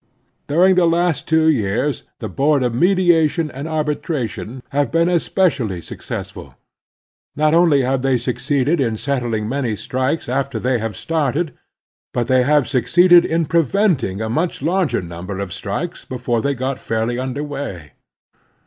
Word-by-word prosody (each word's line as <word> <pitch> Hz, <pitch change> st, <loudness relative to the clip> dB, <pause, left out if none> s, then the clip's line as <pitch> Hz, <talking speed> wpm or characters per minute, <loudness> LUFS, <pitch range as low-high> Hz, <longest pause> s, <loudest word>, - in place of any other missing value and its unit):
During 180 Hz, +6 st, +4 dB
the 180 Hz, -2 st, +3 dB
last 170 Hz, -1 st, +1 dB
two 160 Hz, 0 st, +3 dB
years 130 Hz, 0 st, +1 dB, 0.2 s
the -, -, -5 dB
Board 140 Hz, 0 st, +1 dB
of 120 Hz, -2 st, 0 dB
Mediation 165 Hz, 0 st, +2 dB
and 140 Hz, +4 st, -6 dB
Arbitration 135 Hz, -, -3 dB
have 140 Hz, -2 st, 0 dB
been 165 Hz, +1 st, +2 dB
especially 160 Hz, -, +1 dB
successful. -, -, -8 dB, 0.8 s
Not 155 Hz, +1 st, +2 dB
only 165 Hz, -5 st, +4 dB
have 130 Hz, +1 st, 0 dB
they 135 Hz, -1 st, +2 dB
succeeded 140 Hz, +5 st, 0 dB
in 115 Hz, -4 st, 0 dB
settling 120 Hz, -5 st, -2 dB
many 125 Hz, -3 st, -1 dB
strikes 130 Hz, +8 st, -2 dB
after 135 Hz, 0 st, -1 dB
they 125 Hz, +1 st, 0 dB
were 115 Hz, -1 st, -3 dB
started, 155 Hz, -, -1 dB, 0.6 s
but 120 Hz, -, +1 dB
they 130 Hz, +2 st, +3 dB
have 145 Hz, +1 st, +3 dB
suc 125 Hz, -4 st, 0 dB
ceeded 175 Hz, +3 st, +6 dB
in 165 Hz, 0 st, 0 dB
preventing 155 Hz, -, +1 dB
a -, -, -2 dB
much 155 Hz, +5 st, -2 dB
larger 175 Hz, -, 0 dB
number 85 Hz, +3 st, -7 dB
of 100 Hz, -3 st, -4 dB
strikes 160 Hz, -, -4 dB
before 120 Hz, -2 st, -2 dB
they 140 Hz, +2 st, 0 dB
got 130 Hz, +1 st, -3 dB
fairly 115 Hz, +2 st, -2 dB
tmder 130 Hz, +3 st, -3 dB
way. 100 Hz, -, -6 dB
140 Hz, 150 wpm, -19 LUFS, 120-160 Hz, 0.8 s, ceeded